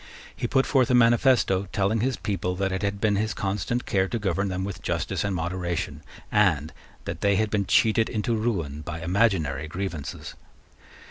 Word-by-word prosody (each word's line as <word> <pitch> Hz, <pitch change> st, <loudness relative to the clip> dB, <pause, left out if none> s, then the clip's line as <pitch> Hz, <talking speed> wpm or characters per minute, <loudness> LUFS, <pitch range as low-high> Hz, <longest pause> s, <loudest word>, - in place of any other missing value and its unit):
He 120 Hz, +5 st, -2 dB
put 135 Hz, +1 st, +2 dB
forth 130 Hz, -4 st, +2 dB
a 125 Hz, -, +4 dB
manifesto, 115 Hz, -5 st, +4 dB
telling 100 Hz, +3 st, +1 dB
his 130 Hz, +3 st, 0 dB
people 90 Hz, -4 st, -2 dB
that 95 Hz, +1 st, -1 dB
it 95 Hz, -, -2 dB
had 100 Hz, 0 st, -1 dB
been 105 Hz, -1 st, +2 dB
his 110 Hz, +1 st, -1 dB
constant 100 Hz, +5 st, -2 dB
care 95 Hz, -1 st, +1 dB
to 115 Hz, -, -2 dB
govern 100 Hz, -2 st, -1 dB
them 95 Hz, -1 st, -2 dB
with 100 Hz, 0 st, -5 dB
justice -, -, -2 dB
and 100 Hz, -1 st, -1 dB
moderation, 85 Hz, 0 st, -3 dB, 0.3 s
and 85 Hz, -8 st, +2 dB, 0.3 s
that -, -, -5 dB
they 100 Hz, 0 st, +3 dB
had 105 Hz, +2 st, 0 dB
been 100 Hz, -3 st, 0 dB
cheated 110 Hz, 0 st, +3 dB
into 115 Hz, +1 st, -1 dB
ruin 85 Hz, -11 st, -2 dB
by 80 Hz, +1 st, -6 dB
imaginary 85 Hz, -7 st, +1 dB
grievances. 85 Hz, -3 st, -5 dB
100 Hz, 180 wpm, -25 LUFS, 90-110 Hz, 0.3 s, a